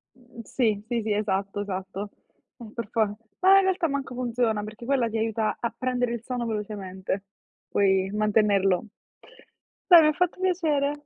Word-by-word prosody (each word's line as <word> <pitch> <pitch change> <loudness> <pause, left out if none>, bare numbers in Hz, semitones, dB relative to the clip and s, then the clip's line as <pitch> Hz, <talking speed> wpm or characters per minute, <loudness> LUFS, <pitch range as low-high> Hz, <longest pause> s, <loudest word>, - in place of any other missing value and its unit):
Mhmm, 245 -2 -13
sì. 215 -5 0
Sì, 235 -2 -1
sì, 215 -1 0
esatto, 200 -1 -1
esatto. 195 +1 -5 0.5
Ma 225 -4 -11
per 230 -3 -5
fo 210 -2 0 0.3
ma 385 +1 +8
in 390 - +5
realtà 370 -3 +1
manco 275 -3 -3
funziona 240 -4 -1
perché 215 +2 -9
quella 255 -4 +1
ti 225 - -3
aiuta 220 -1 -1
a 235 -1 -2
prendere 245 -1 -1
il 235 - -4
sonno 245 -1 -3
velocemente, 195 -3 -4 0.5
poi 195 -1 +2
mantenerlo. 210 -2 +2 1.0
Dai, 345 -3 +9
m'ha 305 0 +4
fatto 360 +2 -1
piacere. 320 -7 +1
225 Hz, 155 wpm, -26 LUFS, 205-255 Hz, 1.0 s, Dai